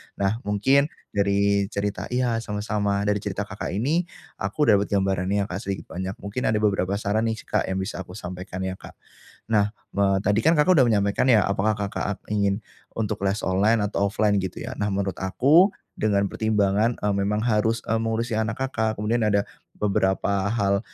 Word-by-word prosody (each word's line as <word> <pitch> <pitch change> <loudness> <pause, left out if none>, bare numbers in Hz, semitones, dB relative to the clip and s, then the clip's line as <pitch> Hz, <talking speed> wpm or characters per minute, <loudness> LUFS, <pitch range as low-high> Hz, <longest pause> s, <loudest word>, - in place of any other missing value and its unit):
Nah, 100 +3 0
mungkin, 135 +8 +3 0.2
dari 100 0 +2
cerita 100 -1 -3
iya 125 -2 0
sama-sama, 105 -2 -1
dari 105 0 +1
cerita - - -3
Kakak - - -5
ini, 155 - 0 0.3
aku 150 - -1
dapat 100 -1 +3
gambarannya 95 0 +1
ya - - -3
Kak 90 - -3
sedikit 100 -3 -5
banyak, 95 +2 -4
mungkin 100 +5 -2
ada 110 - +2
beberapa 100 -2 +1
saran 110 +2 0
nih 110 -1 -3
Kak - - -1
yang 95 - -2
bisa 95 0 -3
aku 90 -1 -8
sampaikan 90 -1 -6
ya 95 0 -4
Kak. - - -12 0.6
Nah, 105 -2 +4 0.2
me 95 0 +1
tadi 105 +2 +2
kan 160 +8 +4
Kakak 160 +2 +4
sudah 130 - +5
menyampaikan 100 +2 +2
ya, 110 -6 +5
apakah 100 +3 +1
Kakak 100 -2 -3
a 105 - 0 0.2
ingin 100 0 0 0.3
untuk 105 -2 -2
les 100 +2 -1
online 105 +4 +2
atau 100 -1 0
offline 105 0 +1
gitu 95 -1 -5
ya, - - -5
nah 105 - 0
menurut 95 -2 -2
aku, 145 - +4 0.2
dengan 100 -2 +2
pertimbangan, 110 +1 +1
e - - -4
memang 100 +2 0
harus, 115 0 +1
e - - -5
mengurusi 115 +1 -1
anak 110 +1 -2
Kakak, 110 -4 -1
kemudian 110 +3 0
ada 100 -1 +2 0.3
beberapa 100 -1 +1
hal, 100 -3 +1
105 Hz, 185 wpm, -24 LUFS, 100-110 Hz, 0.6 s, sudah